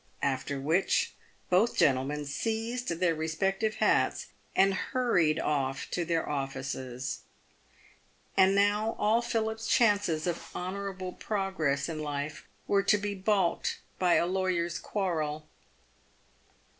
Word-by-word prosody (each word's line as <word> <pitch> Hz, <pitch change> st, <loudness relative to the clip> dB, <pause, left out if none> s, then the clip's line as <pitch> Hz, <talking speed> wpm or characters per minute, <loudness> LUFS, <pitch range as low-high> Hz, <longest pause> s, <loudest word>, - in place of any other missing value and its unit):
After 140 Hz, 0 st, -1 dB
which, 160 Hz, +8 st, +1 dB, 0.4 s
both 195 Hz, +6 st, +3 dB
gentlemen 140 Hz, +2 st, +2 dB
seized 225 Hz, -, -2 dB
their 170 Hz, 0 st, +1 dB
respective 190 Hz, +7 st, -1 dB
hats, -, -, +2 dB, 0.3 s
and 195 Hz, 0 st, +5 dB
hurried 190 Hz, -9 st, +1 dB
off 135 Hz, -2 st, -1 dB
to 175 Hz, -, 0 dB
their 165 Hz, -1 st, 0 dB
offices. 135 Hz, -2 st, -3 dB, 1.2 s
And 190 Hz, +1 st, +5 dB
now 205 Hz, +2 st, +2 dB
all 220 Hz, +3 st, +3 dB
Philip's 225 Hz, -1 st, -2 dB
chances 205 Hz, -9 st, +3 dB
of 175 Hz, -2 st, -2 dB
honourable 185 Hz, 0 st, -4 dB
progress 190 Hz, -9 st, -1 dB
in 160 Hz, -2 st, -4 dB
life 145 Hz, 0 st, -4 dB, 0.2 s
were 200 Hz, -1 st, +3 dB
to 210 Hz, -, +4 dB
be 205 Hz, 0 st, -3 dB
balked 190 Hz, -2 st, +1 dB, 0.2 s
by 180 Hz, -2 st, +4 dB
a -, -, +3 dB
lawyers' 180 Hz, -2 st, 0 dB
quarrel. 155 Hz, -6 st, -2 dB
180 Hz, 115 wpm, -30 LUFS, 150-205 Hz, 1.2 s, and